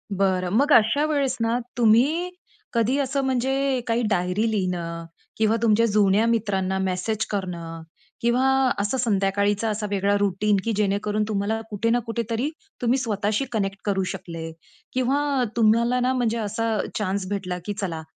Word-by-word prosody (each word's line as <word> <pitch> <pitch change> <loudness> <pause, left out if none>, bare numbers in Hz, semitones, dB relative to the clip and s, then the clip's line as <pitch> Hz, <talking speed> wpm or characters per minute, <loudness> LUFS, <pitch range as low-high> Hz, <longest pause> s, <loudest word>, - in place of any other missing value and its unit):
बरं, 185 -2 +1
मग 285 +4 +3
अशा 230 +7 +4
वेळेस 280 -4 0
ना, 230 +1 +1 0.2
तुम्ही 265 +11 +3 0.4
कधी 235 +3 +2
असं 275 0 0
म्हणजे 265 +1 0
काही 230 +1 +1
डायरी 190 +4 +1
लिहणं 170 -4 -2 0.3
किंवा 220 0 +2
तुमच्या 230 0 +4
जुन्या 205 0 +3
मित्रांना 195 -4 0
मेसेज 190 +4 -1
करणं 170 -4 -4 0.4
किंवा 240 +2 +2 0.4
असं 205 +6 0
संध्याकाळीचा 205 -1 +1
असा 210 0 -2
वेगळा 200 0 +1
रुटीन 205 +1 +1
की 230 - -1
जेणेकरून 210 +1 0
तुम्हाला 215 +1 -1
कुठे 220 +2 -1
ना 240 +1 +3
कुठेतरी 230 +4 -2 0.3
तुम्ही 245 +2 +2
स्वतःशी 215 +1 -1
कनेक्ट 200 -3 -1
करू 195 -2 +1
शकले 165 -3 -7 0.4
किंवा 270 +1 +1
तुम्हाला 235 +2 +3
ना 255 +1 +1
म्हणजे 235 -3 0
असा 220 +1 -1 0.2
चान्स 200 -2 -1
भेटला 185 -3 -3
की 205 - -2
चला, 165 -4 -3
215 Hz, 145 wpm, -24 LUFS, 195-240 Hz, 0.4 s, अशा